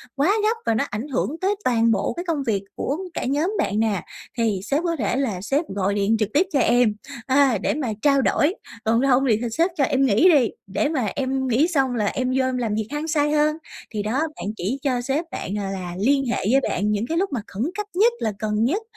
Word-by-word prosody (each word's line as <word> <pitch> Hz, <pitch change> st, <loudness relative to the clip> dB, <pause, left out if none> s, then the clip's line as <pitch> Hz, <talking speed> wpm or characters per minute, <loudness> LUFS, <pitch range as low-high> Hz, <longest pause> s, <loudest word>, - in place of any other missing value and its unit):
quá 295 Hz, +9 st, +3 dB
gấp 450 Hz, +2 st, +2 dB
và 230 Hz, -, +2 dB
nó -, -, +1 dB
ảnh 220 Hz, +7 st, -4 dB
hưởng 290 Hz, +2 st, -2 dB
tới 395 Hz, +2 st, +1 dB
toàn 230 Hz, -2 st, +3 dB
bộ 200 Hz, -3 st, 0 dB
cái 345 Hz, +1 st, -5 dB
công 315 Hz, -5 st, -1 dB
việc 200 Hz, -3 st, 0 dB
của 285 Hz, +4 st, -2 dB, 0.2 s
cả -, -, -3 dB
nhóm 295 Hz, +8 st, 0 dB
bạn 205 Hz, +1 st, 0 dB
nè, 215 Hz, -4 st, +1 dB, 0.4 s
thì 220 Hz, -5 st, +1 dB
sếp 285 Hz, +9 st, 0 dB
có 335 Hz, -1 st, 0 dB
thể 230 Hz, -4 st, -1 dB
là 225 Hz, -10 st, -1 dB
sếp 280 Hz, -, 0 dB
gọi 200 Hz, 0 st, 0 dB
điện 205 Hz, +2 st, +1 dB
trực 215 Hz, -2 st, 0 dB
tiếp 335 Hz, +6 st, +4 dB
cho 280 Hz, -, +3 dB
em, 240 Hz, -3 st, +3 dB, 0.3 s
à, 265 Hz, -4 st, +3 dB
để -, -, +1 dB
mà 280 Hz, -4 st, -2 dB
trao 275 Hz, 0 st, +4 dB
đổi, 300 Hz, +6 st, +2 dB, 0.3 s
còn 230 Hz, +2 st, +3 dB
không 260 Hz, +2 st, +4 dB
thì 215 Hz, -, +4 dB
thì 240 Hz, -, -1 dB
sếp 335 Hz, +9 st, +1 dB
cho 280 Hz, -, +3 dB
em 270 Hz, +1 st, +2 dB
nghỉ 255 Hz, -, +5 dB
đi, 260 Hz, -8 st, +4 dB, 0.2 s
để 210 Hz, +9 st, 0 dB
mà 260 Hz, -9 st, -1 dB
em 265 Hz, -1 st, -1 dB
nghỉ 255 Hz, +7 st, +3 dB
xong 270 Hz, -7 st, +1 dB
là 210 Hz, -2 st, 0 dB
em 255 Hz, +5 st, -1 dB
vô 260 Hz, -, +2 dB
em 255 Hz, -1 st, -1 dB
làm 225 Hz, -4 st, -1 dB
việc 220 Hz, 0 st, -2 dB
hăng 295 Hz, +2 st, -3 dB
say 295 Hz, -2 st, +1 dB
hơn. 305 Hz, +1 st, +2 dB, 0.4 s
Thì 210 Hz, -, -2 dB
đó, 215 Hz, +2 st, -2 dB
bạn 315 Hz, -7 st, -3 dB
chỉ 215 Hz, +10 st, -2 dB
cho 255 Hz, -3 st, 0 dB
sếp 275 Hz, +6 st, -1 dB
bạn, 200 Hz, -, -4 dB
gọi 195 Hz, -2 st, -3 dB
là, 180 Hz, -2 st, -5 dB
liên 275 Hz, +5 st, +2 dB
hệ 240 Hz, -, -1 dB
với 270 Hz, +1 st, +4 dB
bạn 205 Hz, +3 st, 0 dB
những 210 Hz, +2 st, 0 dB
cái 330 Hz, -, -1 dB
lúc 385 Hz, -1 st, 0 dB
mà 235 Hz, -, -1 dB
khẩn 205 Hz, +4 st, -4 dB
cấp 420 Hz, -, -2 dB
nhất 465 Hz, +3 st, +5 dB
là 220 Hz, -, -1 dB
cần 215 Hz, 0 st, 0 dB
nhất 345 Hz, -, +1 dB
260 Hz, 255 wpm, -23 LUFS, 215-295 Hz, 0.4 s, nghỉ